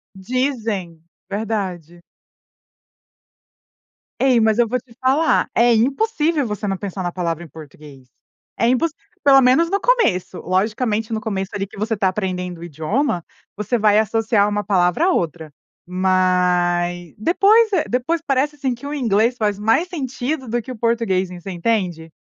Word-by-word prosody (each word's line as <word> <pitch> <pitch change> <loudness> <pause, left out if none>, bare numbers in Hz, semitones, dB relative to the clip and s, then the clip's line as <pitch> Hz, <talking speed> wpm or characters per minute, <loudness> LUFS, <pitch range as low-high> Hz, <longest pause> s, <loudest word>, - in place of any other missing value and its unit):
Dizem. 215 - -3 0.3
Verdade. 190 -6 -4 2.2
Ei, 255 -3 +4
mas 220 0 +2
eu 240 -1 +3
vou 250 +2 -1
te 230 -1 -21
falar, 275 +5 +2
é 235 0 +5
impossível 295 - +1
você 210 -1 -4
não 195 - 0
pensar 190 -1 -5
na 175 - -2
palavra 170 -2 -3
em - - -11
português, 145 -3 -14 0.5
é 230 - +2
impossível, 290 +5 0 0.2
pelo 270 -1 +7
menos 265 +7 +4
no 400 +2 0
começo. 215 - +1
Logicamente, 215 +4 -1
no 220 - -2
começo, 195 -2 -3
ali, 195 -1 -3
que 215 0 -15
você 220 +2 -1
tá 195 -2 +1
aprendendo 180 -2 -3
o - - -9
idioma, 175 - -1 0.3
você 210 +4 -1
vai 210 -1 +4
associar 220 -1 +2
uma 205 0 -1
palavra 190 - +2
a 375 - +3
outra. 160 - -2 0.3
Mas, 180 -2 +1
depois 410 - +4
é 335 - +2
depois 255 +8 0
parece, 285 +2 0
assim, 265 -3 -2
que 280 +4 -9
o 295 - -4
inglês 235 -2 +1
faz 205 -2 -1
mais 225 +12 +2
sentido 265 -3 -4
do 235 +1 -1
que 260 - -8
o 245 - -7
português, 220 -5 0
você 180 +1 -8
entende? 175 -4 -2
215 Hz, 155 wpm, -20 LUFS, 180-255 Hz, 2.2 s, pelo